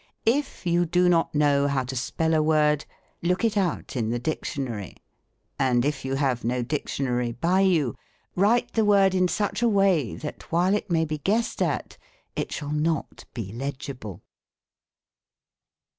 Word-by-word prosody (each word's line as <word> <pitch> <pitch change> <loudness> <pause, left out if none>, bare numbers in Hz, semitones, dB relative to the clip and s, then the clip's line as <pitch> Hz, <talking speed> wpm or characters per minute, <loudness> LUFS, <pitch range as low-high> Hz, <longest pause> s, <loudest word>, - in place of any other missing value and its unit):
If 260 -1 0
you 175 0 +2
do 180 +2 +3
not 165 -3 +2
know 145 -1 +3
how 140 -2 0
to 130 +1 -6
spell 160 +6 -1
a 155 - +4
word, 150 -1 +2 0.4
look 180 +6 +1
it 225 - +1
out 185 -8 -1
in 115 -3 -1
the 120 - 0
dictionary, 120 - -4 0.6
and 125 -2 +2
if 145 -2 -1
you 135 0 -2
have 135 -4 0
no 125 +2 0
dic 145 +5 -3
tionary 125 -3 -2
by 180 +5 +2
you, 165 - +2 0.4
write 210 +6 +2
the 225 - +2
word 200 -2 +4
in 185 -1 +3
such 205 +5 -1
a 240 - +4
way, 195 - +2
that, 150 - -8
while 175 +3 +3
it 210 - -1
may 165 -2 +2
be 155 -1 -4
guessed 220 - 0
at, - - -2 0.4
it - - -3
shall 145 -1 -4
not 155 +1 -2
be 105 -5 -5
legible. 130 - -6
150 Hz, 165 wpm, -25 LUFS, 130-180 Hz, 0.6 s, a